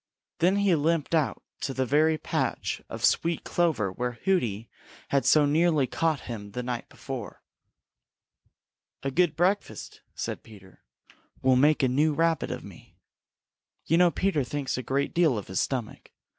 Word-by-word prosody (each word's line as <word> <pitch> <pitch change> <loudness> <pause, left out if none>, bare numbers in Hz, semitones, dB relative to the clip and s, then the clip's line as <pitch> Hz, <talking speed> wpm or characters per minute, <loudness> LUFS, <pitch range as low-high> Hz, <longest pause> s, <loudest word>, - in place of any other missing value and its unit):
Then 180 +3 +3
he 200 -2 +3
limped 160 0 0
out 155 -4 +1 0.2
to 135 - -3
the 130 - 0
very 155 +5 +3
patch - - -2
of - - -1
sweet 165 -1 +1
clover 145 - 0
where 125 +5 -3
Hooty 115 - 0 0.4
had 140 -1 +1
so 150 -1 +6
nearly 155 -1 +3
caught 160 +1 -1
him 105 -4 -7
the 125 - -3
night 120 -1 -4
before. - - -8 1.6
"A 135 - -1
good 175 +3 +2
breakfast," 190 +4 -1
said - - -4
Peter, 95 -4 -16 0.6
"will 130 0 +5
make 145 +3 +4
a - - +5
new 145 +4 +2
Rabbit 165 0 +1
of - - -5
me." - - -14 0.9
You 165 - +3
know 180 -1 +6
Peter 170 -4 0
thinks 135 +2 -3
a 130 - -3
great 135 +3 -1
deal 160 -8 +3
of 100 - -6
his 95 - -1
stomach. 125 -5 -3
145 Hz, 155 wpm, -27 LUFS, 125-165 Hz, 1.6 s, so